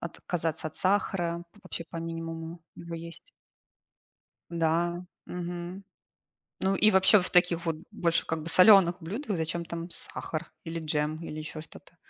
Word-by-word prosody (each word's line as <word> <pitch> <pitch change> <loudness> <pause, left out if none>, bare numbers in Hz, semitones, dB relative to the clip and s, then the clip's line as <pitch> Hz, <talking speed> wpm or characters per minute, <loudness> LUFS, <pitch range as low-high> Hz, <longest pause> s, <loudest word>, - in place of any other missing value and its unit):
отказаться 165 -1 -3
от 155 - -16
сахара, 180 -3 +1 0.2
вообще, 170 - -5
по - - -6
минимуму 165 0 -5 0.2
его 170 0 -7
есть. 165 0 -9 1.2
Да, 170 +1 +1 0.2
мгм. 175 +2 -5 0.8
Ну 190 +1 +3
и 215 +2 +5
вообще, 190 +1 +6
в 180 - 0
таких 175 -1 +3
вот 165 -2 0
больше, 170 -6 +1
как 160 -1 -2
бы, 165 - -5
солёных 185 -1 +7
блюдах 205 - -3
зачем 165 +1 -2
там 170 0 -5
сахар 160 -1 -5
или 165 0 -4
джем, 155 -1 -1
или 155 - -6
ещё 155 0 -6
что-то? 165 +2 -14
170 Hz, 145 wpm, -29 LUFS, 165-180 Hz, 1.2 s, солёных